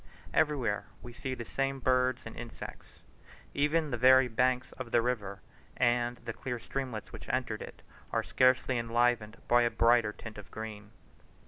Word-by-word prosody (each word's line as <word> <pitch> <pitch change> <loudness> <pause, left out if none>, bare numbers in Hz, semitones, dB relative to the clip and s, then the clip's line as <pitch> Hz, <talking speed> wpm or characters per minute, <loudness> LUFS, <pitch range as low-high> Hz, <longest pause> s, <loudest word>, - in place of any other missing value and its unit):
Everywhere 130 -9 +1 0.2
we 120 - -9
see 130 +2 -4
the 120 - -6
same 135 +3 -1
birds 130 0 +2
and 110 - -8
insects. 120 0 -9 0.5
Even 150 +1 +1
the 120 - -1
very 130 +1 +7
banks 125 +2 +1
of 130 -3 -7
the - - +4
river 105 -5 -2 0.4
and 120 0 +2
of - - -23
the - - -3
clear 130 -3 -4
streamlets 125 -2 -5
which - - -9
entered - - -1
it, - - -10 0.3
were - - +1
scarcely 130 -1 +3
enlivened 115 -2 +1
by 120 0 +5
a 120 - +3
brighter 115 -2 +4
tint 110 0 -9
of 105 - -11
green. 105 -2 -7
120 Hz, 165 wpm, -31 LUFS, 115-130 Hz, 0.5 s, very